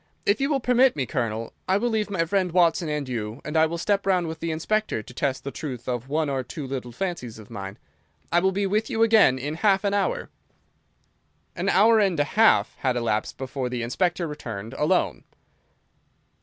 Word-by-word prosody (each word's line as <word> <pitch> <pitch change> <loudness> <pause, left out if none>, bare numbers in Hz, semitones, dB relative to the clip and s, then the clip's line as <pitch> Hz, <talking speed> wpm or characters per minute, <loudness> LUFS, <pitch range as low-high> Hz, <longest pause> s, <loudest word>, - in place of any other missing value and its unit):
If 205 +5 +2
you 275 - +1
will 285 -3 +2
permit 250 +1 +4
me, 140 -3 -1
Colonel, 115 -3 -3
I 190 - +3
will 240 +3 0
leave 215 -1 0
my 175 -4 0
friend 185 +1 0
Watson 170 -1 +3
and 150 -2 -2
you, 115 -1 -4
and 150 - -5
I 160 0 +5
will 170 +2 -4
step 200 +3 0
round 180 -2 +2
with 160 0 -5
the 165 - -3
Inspector 165 - -1
to 125 - -13
test 130 0 -1
the 140 - -4
truth 130 -7 -6
of 125 +1 -3
one 155 +1 0
or 135 -2 -1
two 140 +3 -7
little 130 -2 -5
fancies 125 - -4
of 110 0 -13
mine. 100 -2 -7 0.5
I 175 - +4
will 190 +2 +2
be 200 +1 -1
with 210 +3 0
you 225 - +2
again 220 - +5
in 145 +4 -4
half 195 +3 +2
an 200 -1 +1
hour." 485 - -1 1.2
An - - -1
hour 220 +3 +5
and 195 -5 +2
half 215 +10 +3
had 130 -2 0
elapsed 110 -3 -1
before 130 -1 -4
the 125 -1 -3
Inspector 175 +8 0
returned 115 -8 -6
alone. 175 +5 0
160 Hz, 200 wpm, -25 LUFS, 125-200 Hz, 1.2 s, I